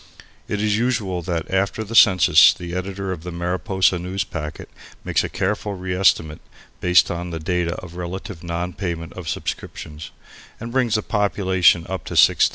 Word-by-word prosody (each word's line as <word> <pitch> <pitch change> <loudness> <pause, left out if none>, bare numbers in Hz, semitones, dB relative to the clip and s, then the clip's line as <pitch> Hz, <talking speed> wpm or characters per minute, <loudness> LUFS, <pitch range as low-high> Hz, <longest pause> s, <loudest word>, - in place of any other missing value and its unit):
It 105 - -2
is 105 0 +1
usual 110 -7 -1
that 85 -1 -3
after 100 +3 0
the 110 +2 -8
census 90 -8 +7
the 85 -1 -7
editor 95 +1 -4
of 90 -4 -5
the 90 +2 -7
Mariposa 90 +2 0
Newspacket 90 -4 -5 0.4
makes - - +1
a - - -3
careful 100 +1 -2
reestimate 90 -4 +1 0.4
(based 90 0 +4
on 85 +1 -4
the 85 -1 -5
data 90 +1 -1
of 90 -1 -10
relative 90 0 -6
non 85 +1 -3
payment 85 -4 -5
of 90 -4 -7
subscriptions), 75 +1 -6 0.5
and 115 +1 -6
brings 120 -3 +1
the 110 - 0
population 95 -5 +2
up 95 0 -5
to - - -6
6,000. - - +6
90 Hz, 165 wpm, -21 LUFS, 85-100 Hz, 0.5 s, census